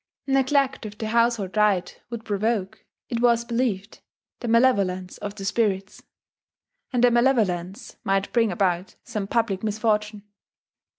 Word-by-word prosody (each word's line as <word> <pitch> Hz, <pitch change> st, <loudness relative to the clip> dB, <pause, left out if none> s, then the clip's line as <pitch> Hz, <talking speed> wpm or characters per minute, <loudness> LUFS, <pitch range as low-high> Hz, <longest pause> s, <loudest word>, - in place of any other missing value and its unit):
Neglect 270 Hz, 0 st, +2 dB
of 210 Hz, 0 st, -11 dB
the 220 Hz, 0 st, -4 dB
household 230 Hz, -4 st, +1 dB
rite 200 Hz, -4 st, +1 dB
would 235 Hz, -2 st, -6 dB
provoke, 205 Hz, -1 st, -1 dB, 0.3 s
it 235 Hz, -1 st, -2 dB
was 235 Hz, -1 st, +3 dB
believed, 230 Hz, -4 st, -2 dB, 0.4 s
the 240 Hz, -, -5 dB
malevolence 200 Hz, -7 st, +2 dB
of 205 Hz, 0 st, -5 dB
the 195 Hz, -2 st, -7 dB
spirits; 195 Hz, -2 st, -1 dB, 0.9 s
and 245 Hz, -2 st, +1 dB
their 245 Hz, -, +6 dB
malevolence 215 Hz, -7 st, +1 dB
might 195 Hz, 0 st, 0 dB
bring 230 Hz, -3 st, +3 dB
about 180 Hz, 0 st, -1 dB
some 205 Hz, -2 st, -4 dB
public 220 Hz, -4 st, 0 dB
misfortune. 210 Hz, -1 st, -1 dB
215 Hz, 130 wpm, -24 LUFS, 195-235 Hz, 0.9 s, their